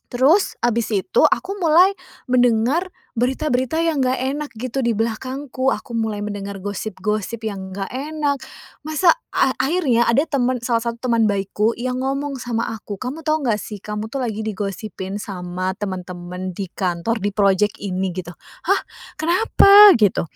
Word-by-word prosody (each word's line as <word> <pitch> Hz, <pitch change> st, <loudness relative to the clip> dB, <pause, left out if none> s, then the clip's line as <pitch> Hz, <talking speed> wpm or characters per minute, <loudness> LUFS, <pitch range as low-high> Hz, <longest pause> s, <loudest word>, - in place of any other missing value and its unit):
terus 280 Hz, +11 st, +3 dB
habis 235 Hz, -2 st, +1 dB
itu 205 Hz, -, +1 dB
aku 395 Hz, +2 st, -1 dB
mulai 350 Hz, +3 st, +5 dB, 0.4 s
mendengar 245 Hz, +8 st, +3 dB, 0.3 s
berita-berita 260 Hz, +3 st, 0 dB
yang 325 Hz, -3 st, +1 dB
nggak 255 Hz, +1 st, +2 dB, 0.2 s
enak 300 Hz, -1 st, -5 dB
gitu 255 Hz, +4 st, -4 dB
di 235 Hz, -, +2 dB
belakangku. 260 Hz, +4 st, -2 dB
Aku 235 Hz, -2 st, -7 dB
mulai 220 Hz, -2 st, -1 dB
mendengar 200 Hz, -1 st, -5 dB
gosip-gosip 215 Hz, +2 st, -3 dB
yang 190 Hz, -2 st, -7 dB
nggak 195 Hz, 0 st, -4 dB
enak. 285 Hz, +1 st, -2 dB, 0.5 s
Masa 310 Hz, +3 st, +4 dB, 0.2 s
a 265 Hz, -, +3 dB
akhirnya 265 Hz, -4 st, +2 dB
ada 250 Hz, +5 st, +4 dB
temen 255 Hz, -3 st, 0 dB
salah 235 Hz, -2 st, +1 dB
satu 235 Hz, +2 st, -3 dB
teman 230 Hz, -1 st, +3 dB
baikku 205 Hz, +3 st, 0 dB
yang 255 Hz, +1 st, -2 dB
ngomong 275 Hz, +1 st, -2 dB
sama 230 Hz, -2 st, -2 dB
aku, 205 Hz, -1 st, -7 dB
"Kamu 280 Hz, +6 st, -5 dB
tahu 310 Hz, -2 st, +1 dB
nggak 210 Hz, -2 st, +2 dB
sih 210 Hz, -3 st, -8 dB
kamu 210 Hz, +1 st, -4 dB
tuh 275 Hz, -, -2 dB
lagi 220 Hz, -2 st, -3 dB
digosipin 200 Hz, -1 st, -4 dB
sama 185 Hz, -1 st, -4 dB
temen-temen 180 Hz, -1 st, -5 dB
di 195 Hz, -1 st, -5 dB
kantor, 185 Hz, +5 st, -1 dB
di 205 Hz, +1 st, 0 dB
project 200 Hz, 0 st, +2 dB
ini." 190 Hz, -2 st, -2 dB
Gitu. 175 Hz, -1 st, -5 dB, 0.4 s
"Hah, -, -, +4 dB, 0.4 s
kenapa?" 400 Hz, +3 st, +7 dB
Gitu. 205 Hz, -3 st, +3 dB
230 Hz, 155 wpm, -21 LUFS, 200-275 Hz, 0.5 s, kenapa